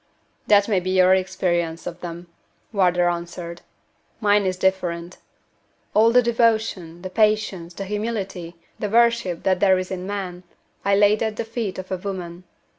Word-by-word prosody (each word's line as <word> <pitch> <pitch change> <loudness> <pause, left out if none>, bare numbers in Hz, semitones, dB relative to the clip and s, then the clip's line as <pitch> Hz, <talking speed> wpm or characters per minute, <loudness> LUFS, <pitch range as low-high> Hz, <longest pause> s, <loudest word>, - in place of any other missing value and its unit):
"That 205 -1 +5
may 205 -4 +2
be 185 +1 -4
your 185 0 +5
experience 175 -3 -1
of 175 0 -6
them," 175 0 -7 0.5
Wardour 180 -3 +3
answered; 170 0 -4 0.6
"mine 205 -2 +3
is 185 -1 -1
different. 180 -2 -1 0.8
All 220 +2 +5
the 250 +1 +5
devotion, 220 -7 0
the 185 - -4
patience, 205 -5 +1
the 195 - -5
humility, 200 -5 -4 0.2
the 210 - -2
worship 235 -6 +2
that 185 -1 +2
there 190 -1 +4
is 185 0 -4
in 185 0 -4
man, 190 -3 -4 0.4
I 200 0 +3
laid 205 +1 +4
at 220 -1 -1
the 225 - -3
feet 225 -4 -4
of 185 0 -7
a 185 - 0
woman. 180 -2 -6
190 Hz, 160 wpm, -23 LUFS, 175-210 Hz, 0.8 s, That